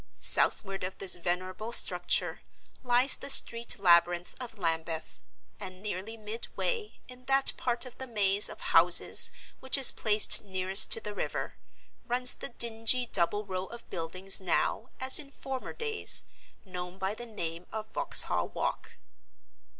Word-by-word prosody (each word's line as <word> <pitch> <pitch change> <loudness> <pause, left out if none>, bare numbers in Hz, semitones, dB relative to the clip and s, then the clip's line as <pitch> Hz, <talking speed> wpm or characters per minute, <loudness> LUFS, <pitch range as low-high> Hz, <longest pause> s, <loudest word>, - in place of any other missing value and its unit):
Southward 195 -2 0
of 185 +1 -7
this 195 -2 -1
venerable 185 +5 -5
structure - - +1 0.4
lies 250 +1 +2
the - - -8
street 235 -3 +6
labyrinth 175 -2 +1
of 240 -3 -9
Lambeth; 165 -2 -5 0.4
and 185 -2 -9
nearly 210 +2 -7
midway, 235 - -6
in 255 0 -15
that 270 0 +2
part 240 +1 -4
of 250 - -13
the 260 - -8
maze 205 -3 +2
of - - -12
houses - - +3 0.3
which 265 +1 +2
is 270 - +7
placed 215 -1 +3
nearest 190 0 +5
to - - +4
the 210 -1 -8
river, - - -6 0.5
runs 250 +1 +1
the - - -9
dingy 235 +1 +1
double 205 0 -2
row 185 -1 -6
of 235 0 -13
buildings 185 +3 -2
now, 190 +6 -3
as 260 0 +5
in 285 -2 -10
former 270 -2 -8
days, 445 -2 -1 0.4
known 180 -1 -8
by 195 +1 -4
the 240 +2 -10
name 170 -5 -8
of 220 0 -7
Vauxhall - - +4
Walk. - - -6
210 Hz, 145 wpm, -27 LUFS, 185-245 Hz, 0.5 s, is